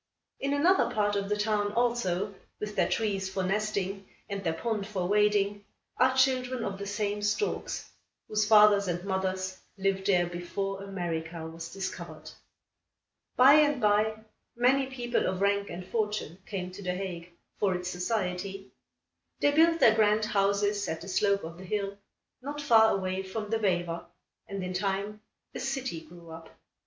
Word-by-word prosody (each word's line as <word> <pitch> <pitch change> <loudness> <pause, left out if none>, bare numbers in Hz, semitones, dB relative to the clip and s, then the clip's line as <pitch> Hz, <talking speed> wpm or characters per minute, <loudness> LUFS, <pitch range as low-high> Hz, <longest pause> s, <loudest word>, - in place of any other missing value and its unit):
In 275 +1 -1
another 350 +7 +4
part 205 -1 +1
of 200 0 -2
the 210 - +1
town, 210 -1 0
also, 210 -5 0 0.3
with 210 0 -5
their - - +2
trees 200 -4 -1
for 190 0 -2
nesting, 195 0 -2 0.2
and 200 -1 -4
their 165 - +1
pond 210 +1 -2
for 190 -4 -2
wading, 205 0 +2 0.3
are 260 +1 +3
children 255 -2 +2
of 195 -1 -4
the 200 - -5
same 205 0 -2
storks, 210 - -1 0.4
whose 215 0 +1
fathers 210 -2 +6
and 175 +1 -2
mothers 190 -1 -2 0.2
lived 195 0 0
there 180 -3 +4
before 195 +3 -4
America 170 -4 -4
was 165 0 -8
discovered. 195 -1 -6 1.0
By 260 +3 +8
and 295 -2 +3
by, 215 0 +2 0.3
many 260 +3 +3
people 245 -2 -1
of 185 0 -1
rank 200 0 +1
and 180 +2 -7
fortune 210 -6 -2
came 185 -3 -4
to 195 +2 -10
The 180 -1 -2
Hague, 180 -2 -5 0.3
for 195 -3 +2
its 180 0 -3
society. 190 0 -3 0.7
They 290 - +4
built 330 +2 +4
their 220 - +7
grand 215 0 +3
houses 205 -1 +1
at 160 0 -3
the - - -9
slope 200 +1 +2
of 165 +2 -8
the - - -9
hill, 200 +1 -2 0.5
not 290 +3 -5
far 225 -6 +5
away 185 -1 -1
from 210 +3 -5
the 225 - +1
Vijver, 175 -4 0 0.4
and 195 -1 -4
in 185 0 -4
time 200 +3 -2 0.3
a - - -5
city 265 -9 -3
grew 170 +1 -14
up. 165 0 -10
200 Hz, 165 wpm, -29 LUFS, 185-215 Hz, 1.0 s, By